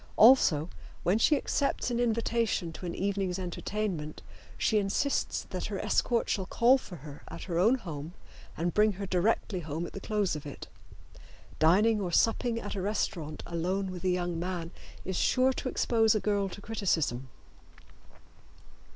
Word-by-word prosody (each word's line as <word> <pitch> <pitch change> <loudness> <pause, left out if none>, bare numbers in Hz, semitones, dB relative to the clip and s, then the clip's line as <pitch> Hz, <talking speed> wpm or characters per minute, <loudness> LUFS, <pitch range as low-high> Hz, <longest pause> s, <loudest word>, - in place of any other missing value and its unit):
Also 200 - +6 0.4
when 190 +5 +2
she 295 +5 +4
accepts 275 -2 -1
an 240 - 0
invitation 230 -6 0
to 180 - -7
an 170 - -4
evening's 195 -2 -1
entertainment 180 -3 -4 0.3
she 215 - +2
insists 205 +8 0
that - - -3
her - - -4
escort 235 -2 +1
shall 190 -3 -1
call 250 +3 +4
for 185 - -10
her 145 -2 -10
at - - -8
her 170 -3 -2
own 220 +8 +5
home 165 - -7 0.4
and 170 +2 -1
bring 210 0 +4
her 200 +1 -5
directly 190 +1 0
home 160 +1 -4
at - - -9
the - - -5
close 210 -5 0
of 150 - -6
it. 145 -3 -8 0.9
Dining 205 +7 +4
or 180 -3 -2
supping 230 +4 +2
at 205 - -5
a 195 - -3
restaurant 180 -6 -2
alone 185 +3 -2
with 180 -1 -8
a 185 - +2
young 175 -2 -1
man 175 -1 -3 0.3
is 190 -1 -2
sure 260 +1 +3
to 255 - -3
expose 225 -3 +2
a - - +2
girl 200 -2 0
to 200 - -9
criticism. 160 - -1
195 Hz, 165 wpm, -30 LUFS, 170-220 Hz, 0.9 s, Also